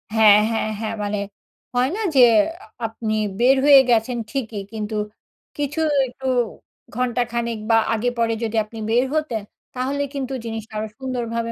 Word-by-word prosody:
হ্যাঁ, 210 -2 +7
হ্যাঁ, 220 -1 -1
হ্যাঁ। 225 0 -3
মানে 205 0 -2 0.6
হয় 250 +2 +3
না 445 - -3
যে - - +5 0.7
আপনি 225 -1 -3 0.3
বের 260 +3 +5
হয়ে 285 -2 +9
গেছেন 235 +1 +2
ঠিকই, 225 -7 -3
কিন্তু 215 0 -4 0.6
কিছু 290 +2 -2 0.3
একটু 260 +2 -11 0.7
ঘণ্টাখানেক 235 -2 -1
বা 225 - +6 0.2
আগে 235 +2 0
পরে 230 -1 +1
যদি 225 0 -2
আপনি 225 +1 -10
বের 240 +3 +3
হতেন 275 -8 -1 0.3
তাহলে 270 +3 -1
কিন্তু 270 -1 -4
জিনিসটা 225 -1 -6
আরো 215 +1 -2
সুন্দরভাবে 235 -3 -3
235 Hz, 145 wpm, -22 LUFS, 220-255 Hz, 0.7 s, হয়ে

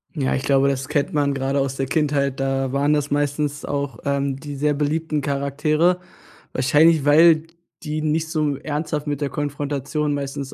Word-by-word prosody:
Ja, 135 -4 0
ich 130 - -2
glaube, 140 0 +3
das 135 -1 -2
kennt 145 -2 0
man 145 -2 +1
gerade 135 +1 -1
aus 135 -1 -1
der 135 -1 -2
Kindheit, 140 -3 0
da 135 -1 -1
waren 140 +2 +2
das 145 -1 0
meistens 145 0 -1
auch, 140 -4 -3
ähm, 140 -1 0
die 145 0 -7
sehr 150 +1 +1
beliebten 150 +1 -1
Charaktere. 150 +5 +1 0.5
Wahrscheinlich, 150 +4 +4
weil 155 +2 +5 0.3
die 155 -1 -3
nicht 155 +1 0
so 150 -3 0
ernsthaft 150 0 -3
mit 145 0 -2
der 140 - 0
Konfrontation, 145 +1 -2
meistens, 140 -1 -4
145 Hz, 170 wpm, -22 LUFS, 140-150 Hz, 0.5 s, weil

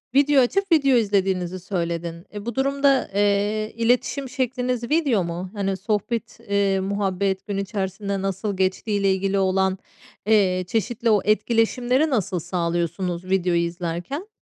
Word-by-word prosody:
video 280 -1 +5
açıp 385 +9 0
video 275 -5 +5
izlediğinizi 190 -4 0
söyledin. 170 -2 -4
E, 205 0 -7
bu 235 -2 -4
durumda, 275 -1 +2
eee, 205 +1 +1
iletişim 250 +3 +1
şekliniz 250 -1 -1
video 285 - +2
mu? 175 +2 -5
Hani, 195 -2 -1
sohbet, 210 +3 -2
ııı, 195 -1 +2
muhabbet 195 0 -1
gün 200 -1 -2
içerisinde 195 0 -3
nasıl 195 +1 -2
geçtiğiyle 195 +1 +1
ilgili 195 +1 0
olan, 190 0 +1 0.5
eee, 190 -4 +3
çeşitli 230 +2 -1
o 210 -2 +4
etkileşimleri 240 +6 +2
nasıl 200 -8 0
sağlıyorsunuz 175 +1 -2
videoyu 180 -2 +1
izlerken? 175 - -4
200 Hz, 130 wpm, -23 LUFS, 185-235 Hz, 0.5 s, video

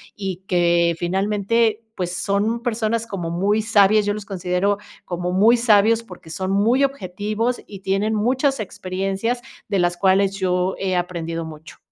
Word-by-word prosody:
y 190 -2 -5
que 170 -1 +2
finalmente, 210 +5 0
pues, 180 -1 -3
son 205 +5 0
personas 230 -1 -1
como 180 -6 -4
muy 200 +5 +1
sabias, 210 -1 +4
yo 205 - +1
los 210 -1 -7
considero 190 +1 0 0.3
como 180 0 -3
muy 215 +6 +5
sabios 225 -1 +4
porque 180 -6 -13
son 190 +3 -3
muy 230 +8 +3
objetivos 215 -1 -2
y 200 - -9
tienen 195 +3 0
muchas 255 +5 +1
experiencias 195 +4 -3 0.3
de 200 -2 0
las 175 0 +1
cuales 195 +1 +3
yo 180 0 0
he 185 -1 -1
aprendido 165 -2 -3
mucho. 155 0 -11
195 Hz, 150 wpm, -21 LUFS, 180-220 Hz, 0.3 s, muy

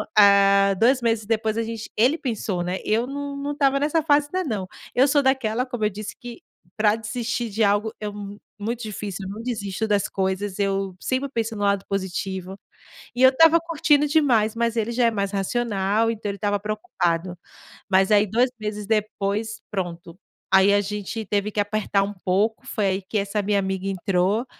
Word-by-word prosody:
ah, 200 -1 +6
2 250 +3 +4
meses 225 -2 0
depois 220 0 0
a 230 - +1
gente 225 -1 -6
ele 250 +9 +4
pensou, 215 -7 -2
né, 180 +1 -2
eu 225 +3 +1
não 285 +1 -5
não 280 +1 -3
estava 275 -1 +2
nessa 305 +3 +1
fase 290 -1 +3
ainda 370 -3 -1
não. 205 -7 -3 0.3
Eu 260 +3 +4
sou 285 0 +3
daquela, 255 -3 +1
como 245 -4 -5
eu - - +3
disse, 210 +1 -7
que 240 -1 -9 0.3
pra 215 -1 +3
desistir 230 +1 -3
de 220 +2 0
algo 205 +2 +2
é 210 - -4
mu 205 0 -8 0.2
muito 230 +3 -3
difícil, 205 -3 -5
eu - - -6
não 220 - -7
desisto 220 -3 -3
das 205 -2 +1
coisas, 190 +1 -2
eu 195 -1 -1
sempre 260 +6 -2
penso 225 -3 -2
no 205 - -5
lado 200 -1 +1
positivo. 190 0 -4 0.6
E 245 - -2
eu 260 - +9
estava 325 +5 +5
curtindo 300 -3 +2
demais, 250 -8 +2
mas 235 0 0
ele 225 +1 0
já 245 0 +2
é 230 - +3
mais 200 -2 -2
racional, 205 +1 0
então 220 -2 -3
ele 200 - -4
estava 205 +1 0
preocupado. 180 - -2 0.5
Mas 190 +1 +3
aí 210 0 +5
2 240 +6 +2
meses 210 -1 -5
depois, 215 0 -1
pronto. 175 -3 -5 0.4
Aí 190 +1 +6
a 205 - +4
gente 210 +2 -5
teve 205 +1 -1
que 210 - -3
apertar 205 -1 +1
um 200 +1 -4
pouco, 205 +4 +1
foi 210 - -1
aí 190 +1 0
que 195 +3 -4
essa 205 +1 -1
minha 205 0 +1
amiga 190 0 -2
entrou, 195 +3 0
210 Hz, 195 wpm, -23 LUFS, 195-235 Hz, 0.6 s, eu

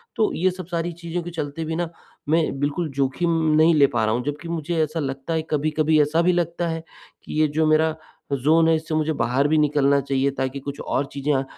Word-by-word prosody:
तो 215 - +2
ये 185 +3 +2
सब 185 -1 -8
सारी 170 -1 -2
चीज़ों 170 +1 -5
के 175 - -7
चलते 160 -1 -4
भी 160 +1 -3
ना 170 0 -2 0.4
मैं 155 -3 +1
बिल्कुल 145 +4 -1
जोखिम 140 +5 0 0.3
नहीं 160 +2 +5
ले 140 -2 +6
पा 110 -2 +2
रहा 110 - +1
हूँ। 125 - -2
जब्कि 145 +3 -4
मुझे 165 0 -1
ऐसा 155 +2 -3
लगता 135 +2 -3
है 160 - +1
कभी-कभी 155 +1 +2
ऐसा 150 +3 +2
भी 180 +1 +3
लगता 170 0 -1
है 165 0 -4 0.4
कि - - -8
ये 155 - +4
जो 155 +2 0
मेरा 155 +1 +3 0.5
ज़ोन 160 +3 +4
है 165 - +4
इससे 160 0 -3
मुझे 155 0 +1
बाहर 130 +1 +1
भी 155 +1 +2
निकलना 140 -2 +3
चाहिए 135 0 0
ताकि 135 0 -3
कुछ 140 +1 -7
और 140 - -1
चीज़ें 140 +1 -1
अ, 135 - +1
155 Hz, 230 wpm, -23 LUFS, 140-165 Hz, 0.5 s, ले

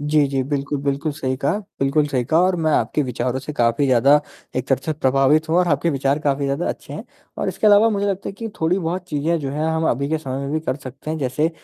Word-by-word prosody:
जी, 150 0 +2
जी। 135 -1 0
बिल्कुल, 140 0 -2
बिल्कुल 140 +2 -1
सही 130 -3 -2
कहा 145 +9 0 0.2
बिल्कुल 145 +2 +2
सही 130 -3 0
कहा, 160 +6 +3
और 185 0 +2
मैं 160 -1 +1
आपके 150 - +1
विचारों 125 0 -2
से 145 +3 -6
काफ़ी 120 +1 +2
ज़्यादा 135 +4 +5 0.4
एक 130 - -1
तरह 135 -1 +2
से 155 - 0
प्रभावित 140 +2 +2
हूँ 165 - +2
और 180 - +2
आपके 150 +2 +1
विचार 140 +1 0
काफ़ी 140 -2 0
ज़्यादा 140 +5 -1
अच्छे - - -6
हैं - - -6 0.3
और - - -1
इसके 215 - -1
अलावा 210 +2 +6
मुझे 200 -1 0
लगता 195 -1 -2
है - - -5
कि 225 +3 -6
थोड़ी-बहुत 175 +1 0
चीज़ें 160 +3 0
जो 135 - -3
हैं, 150 +3 -2
हम 160 0 0
अभी 140 +4 -1
के 160 - 0
समय 135 -3 -4
में 140 - -4
भी 155 - 0
कर 145 - -2
सकते 135 +2 -8
हैं, 160 - -2
जैसे 145 +4 0
145 Hz, 255 wpm, -21 LUFS, 135-160 Hz, 0.4 s, अलावा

